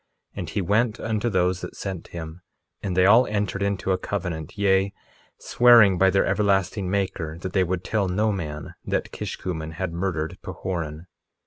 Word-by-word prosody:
1:11 - - -20
And - - -4
he 100 - -1
went 110 +4 +1
unto 110 +1 -1
those 90 -2 +1
that - - -7
sent 95 -4 -5
him, 80 0 -8 0.4
and 95 -3 -3
they 90 - +5
all 115 +6 +6
entered 100 -1 -2
into 100 -1 0
a 95 - +1
covenant, 85 -5 -4
yea, 100 -1 +2 0.4
swearing 115 -7 +6
by 95 - +5
their 95 +1 +2
everlasting 100 -2 +1
Maker, 95 -5 -2
that 95 - -5
they 95 - +3
would 90 0 -2
tell 105 -3 0
no 105 +4 +1
man 75 -6 -5
that - - -2
Kishkumen 80 -3 -5
had 85 +1 -3
murdered 85 -1 -2
Pahoran. 85 -3 -5
95 Hz, 175 wpm, -24 LUFS, 85-100 Hz, 0.4 s, all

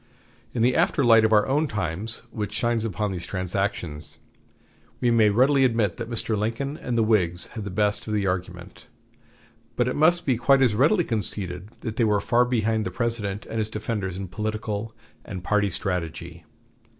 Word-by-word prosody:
In 115 - +1
the 125 +1 +3
after 140 - +2
light 115 -1 +6
of 110 - +3
our 105 -1 +4
own 150 +4 +1
times 105 - -3
which 105 -2 -4
shines 120 -1 0
upon 105 0 -2
these 90 -2 -5
transactions, 90 -5 -3 0.8
we 120 -1 +2
may 110 -2 +5
readily 135 +6 +4
admit 115 -7 +1
that 115 -1 -5
Mr. 115 -1 -1
Lincoln 115 +7 -2
and 125 -6 -3
the 115 - +4
Whigs 90 -6 +1
had 110 -3 -5
the - - -4
best 105 +3 0
of 110 - -2
the 100 -2 0
argument, 90 -1 -4 0.9
but 120 - +1
it 125 - -1
must 170 +3 +3
be 130 -4 +2
quite 135 +3 +4
as 120 -5 +3
readily 155 - +3
conceded 100 - -3
that 115 -2 -4
they 120 - +3
were 105 -2 +3
far 120 +4 +2
behind 110 -3 0
the 95 - -3
President 105 0 -3
and 115 - -4
his 110 0 -1
defenders 105 -4 -3
in 95 0 -5
political 110 +2 -4 0.3
and 90 -2 -7
party 105 +1 +1
strategy. 85 -2 -4
110 Hz, 185 wpm, -25 LUFS, 95-120 Hz, 0.9 s, light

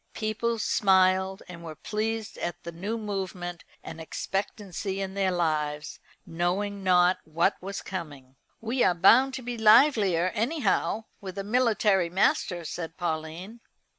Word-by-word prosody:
People 230 +2 -1
smiled, 190 -2 +2
and 170 -2 -10
were 160 -2 -7
pleased 220 +4 -3
at 175 - -4
the 170 - -6
new 200 +7 -4
movement 185 -5 -5 0.2
and 160 - -8
expectancy 195 +2 -4
in 190 -1 -4
their 195 -1 +1
lives, 155 -4 -1 0.3
knowing 190 +4 -2
not 180 -1 +4
what 165 +5 +1
was 195 +2 -6
coming. 145 -8 -7 0.2
"We 235 +3 0
are 180 - +3
bound 250 +10 +5
to 255 - -6
be 240 -1 -5
livelier, 215 - +5
anyhow, 225 -3 0 0.2
with 190 -1 -8
a 195 - -2
military 210 -5 +2
master," 175 -1 +1
said 165 0 -6
Pauline. 170 +6 -4
190 Hz, 135 wpm, -27 LUFS, 175-215 Hz, 0.3 s, bound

